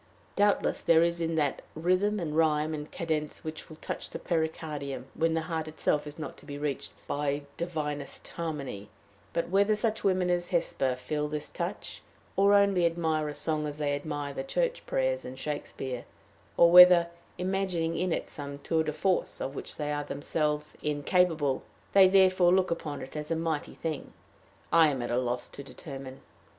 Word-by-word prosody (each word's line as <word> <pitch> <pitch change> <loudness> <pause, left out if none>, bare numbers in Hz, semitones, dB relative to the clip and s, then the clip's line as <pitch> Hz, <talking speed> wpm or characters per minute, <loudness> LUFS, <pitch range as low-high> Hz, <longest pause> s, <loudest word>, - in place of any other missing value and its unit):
Doubtless 205 0 +2
there 165 0 +5
is 170 0 +1
that 160 -4 0
in 160 - -8
rhythm 200 +4 +2
and 155 -4 -3
rhyme 155 -1 +2
and 150 0 -5
cadence 155 -4 -3
which 155 0 -7
will 155 - -10
touch - - -5
the - - -5
pericardium 155 -5 -3
when 165 0 +1
the 160 - +1
heart 160 -1 -3
itself 150 -1 0
is 150 - -8
not 155 - -6
to - - -15
be 145 -1 -6
reached 145 -2 -3
by 145 0 -1
divinest 150 -4 -4
harmony; 140 -11 -5 0.4
but, 170 - -1
whether 200 +3 +3
such 220 +1 -1
women 185 -2 +2
as 175 0 0
Hesper 135 -7 0
feel 150 +4 -2
this 150 0 -4
touch - - -5 0.3
or 200 +1 +5
only 200 -4 +4
admire 160 -2 0
a 145 - -6
song 150 +1 -1
as 145 0 -6
they 145 -1 0
admire 145 -1 -3
the 135 - -4
church - - -1
prayers 130 0 0
and 130 +1 -8
Shakespeare, 135 -3 -4 0.5
or 170 0 +7
whether, 180 -1 +9 0.3
imagining 180 -3 -1
in 180 0 0
it - - -1
some 140 -2 -6
tour 160 +2 0
de 155 -1 -2
force 190 +2 0
of 135 - -3
which - - -7
they 150 -1 -2
are 145 0 -2
themselves 150 0 -2
incapable, 150 -1 +1 0.3
they 195 -1 +8
therefore 185 -2 +5
look 185 -1 +3
upon 150 -3 -3
it 130 - -10
as 150 0 -4
a 165 - +1
mighty 160 -2 -2
thing, 160 -3 -4 0.6
I 165 -1 +7
am 135 -4 -2
at 120 - -3
a 120 - +2
loss 125 -1 -2
to - - -9
determine. 135 -1 -9
155 Hz, 180 wpm, -29 LUFS, 145-175 Hz, 0.6 s, whether